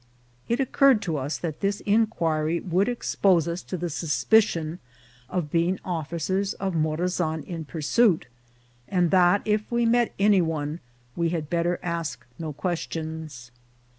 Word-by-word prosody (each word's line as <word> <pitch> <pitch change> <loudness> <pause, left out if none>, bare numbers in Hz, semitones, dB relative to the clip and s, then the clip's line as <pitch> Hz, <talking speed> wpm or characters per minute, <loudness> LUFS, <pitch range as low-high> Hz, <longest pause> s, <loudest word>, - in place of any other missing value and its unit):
It 235 +2 +1
occurred 270 -2 +4
to 165 -4 -1
us 140 +3 -2
that 160 -3 -5
this 200 +1 0
inquiry 170 -7 +1
would 185 +4 +1
expose 190 -8 +2
us 170 +1 -3
to 185 - -5
the 175 +1 -2
suspicion 165 - +1 0.5
of 175 -5 -2
being 175 +2 +1
officers 175 +3 -2
of 195 -2 -3
Morazan 160 0 -1
in 165 0 -6
pursuit, 170 +5 +2 0.6
and 180 0 +1
that, 180 +1 +4
if 210 +1 0
we 235 0 +2
met 235 0 +2
any 200 -1 +4
one, 155 -1 -2 0.4
we 170 -1 +1
had 160 -3 -3
better 175 +1 +1
ask 170 -2 -3
no 160 -2 -4
questions. 160 -4 -5
170 Hz, 140 wpm, -25 LUFS, 160-195 Hz, 0.6 s, occurred